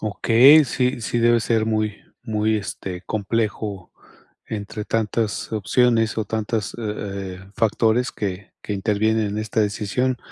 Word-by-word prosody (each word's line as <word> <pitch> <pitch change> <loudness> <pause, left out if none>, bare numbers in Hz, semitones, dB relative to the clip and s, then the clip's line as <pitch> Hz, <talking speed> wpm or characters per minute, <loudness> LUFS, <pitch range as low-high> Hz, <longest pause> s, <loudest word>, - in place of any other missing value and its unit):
Okey, 120 +8 +6
sí, 125 0 -1
sí, 120 +1 -2
debe 120 0 +4
ser 110 -1 +1
muy, 110 -1 0 0.3
muy, 110 -2 0
este, 95 -2 -5
complejo 105 -2 -2 0.6
entre 105 0 -5
tantas 110 0 -1
opciones 115 +2 +2
o 110 - 0
tantas, 110 0 -2
eh 100 -4 -5
eh, 95 +1 -16
factores 115 +2 +2
que 95 -1 -5
que - - -4
intervienen 105 +2 +1
en 105 +1 -3
esta 110 +1 -1
decisión. 105 +5 0
110 Hz, 135 wpm, -22 LUFS, 105-115 Hz, 0.6 s, Okey